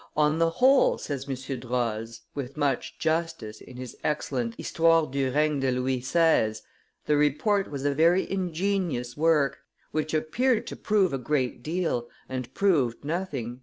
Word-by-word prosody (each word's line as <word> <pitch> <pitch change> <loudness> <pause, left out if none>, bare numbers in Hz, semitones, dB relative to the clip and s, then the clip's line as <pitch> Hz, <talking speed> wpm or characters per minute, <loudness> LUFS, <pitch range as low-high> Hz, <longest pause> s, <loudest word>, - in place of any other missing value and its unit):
"On 150 +1 +3
the 165 0 +4
whole," 260 +10 +4
says 140 -1 -5
M. 135 0 -4
Droz, 115 -2 -3
with 140 0 -6
much 140 -4 -1
justice, 160 -9 -2
in 125 - -12
his 125 -1 -7
excellent 125 -6 -1
Histoire 165 -1 +3
du 135 -1 -1
regne 150 +1 +2
de 135 - +1
Louis 125 0 -1
XVI., 130 -7 +2 0.5
"the 150 - +2
Report 150 +8 +2
was 140 -1 -5
a 145 - +2
very 170 +5 +3
ingenious 180 -8 -1
work, 150 -2 +2 0.3
which 155 0 -1
appeared 230 +11 +1
to - - -6
prove 200 -7 +1
a 135 - -1
great 130 -2 -1
deal 155 -6 -2 0.2
and 130 -2 -5
proved 145 -11 +1
nothing." 145 -8 -3
145 Hz, 155 wpm, -27 LUFS, 125-165 Hz, 0.5 s, the